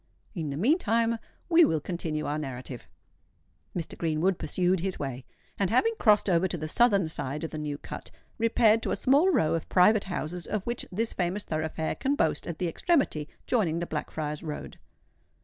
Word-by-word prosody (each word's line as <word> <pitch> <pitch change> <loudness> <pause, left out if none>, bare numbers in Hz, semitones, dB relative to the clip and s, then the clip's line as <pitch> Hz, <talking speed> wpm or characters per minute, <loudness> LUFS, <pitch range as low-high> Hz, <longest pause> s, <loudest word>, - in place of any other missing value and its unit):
In 165 -7 -3
the 140 - -4
meantime 230 - +2 0.3
we 340 0 +6
will 160 - +3
continue 155 -2 -3
our 150 +1 -1
narrative. 130 -3 -7 0.9
Mr. 165 - -4
Greenwood 165 +3 0
pursued 185 0 +1
his 190 +2 -2
way, 130 -2 -5 0.3
and, 195 -2 +2
having 350 - +3
crossed 210 -3 +4
over 180 0 +3
to 175 - -3
the 155 -1 -4
southern 200 -1 +4
side 150 -1 -4
of 160 - -4
the 155 - -5
New 150 -1 -3
Cut, - - -8 0.3
repaired 225 -1 +4
to - - -3
a - - +1
small 285 +8 +4
row 160 - +2
of 165 - -3
private 200 +3 +5
houses 175 -2 -4
of 210 -2 -2
which 240 0 -3
this 225 +5 -1
famous 185 +3 -1
thoroughfare 160 0 -2
can 275 +2 0
boast - - 0
at 170 - -4
the 180 - -1
extremity 165 - +1 0.2
joining 185 -10 +1
the 170 - -2
Blackfriars' 150 -1 -4
Road. 155 -3 -7
175 Hz, 185 wpm, -28 LUFS, 155-220 Hz, 0.9 s, we